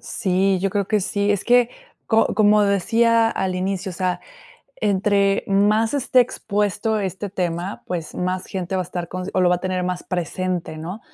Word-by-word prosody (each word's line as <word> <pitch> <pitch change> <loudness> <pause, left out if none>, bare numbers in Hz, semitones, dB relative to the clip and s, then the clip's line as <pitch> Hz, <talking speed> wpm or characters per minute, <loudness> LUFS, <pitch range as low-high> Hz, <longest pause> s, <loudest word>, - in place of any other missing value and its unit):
Sí, 190 -2 0
yo 195 0 0
creo 200 -1 -1
que 215 -1 +1
sí. 200 +2 0
Es 205 - 0
que 245 0 +4 0.4
co 225 -2 +2
como 210 0 +5
decía 225 +4 +3
al 190 -1 -2
inicio, 190 +1 -2
o - - -7
sea, 185 -1 -1 0.6
entre 200 - +1
más 210 +5 +2
esté 260 -2 +3
expuesto 215 -1 -1
este 190 +1 -4
tema, 180 0 -3
pues 170 -3 -5
más 185 +1 -2
gente 190 0 -3
va 185 - 0
a - - -8
estar 170 0 -5
con 185 0 -5
o - - +1
lo 180 - +4
va 180 - +3
a - - -7
tener 185 -1 -2
más 180 0 -3
presente, 180 -1 -3
¿no? 180 +7 -6
195 Hz, 190 wpm, -21 LUFS, 180-210 Hz, 0.6 s, como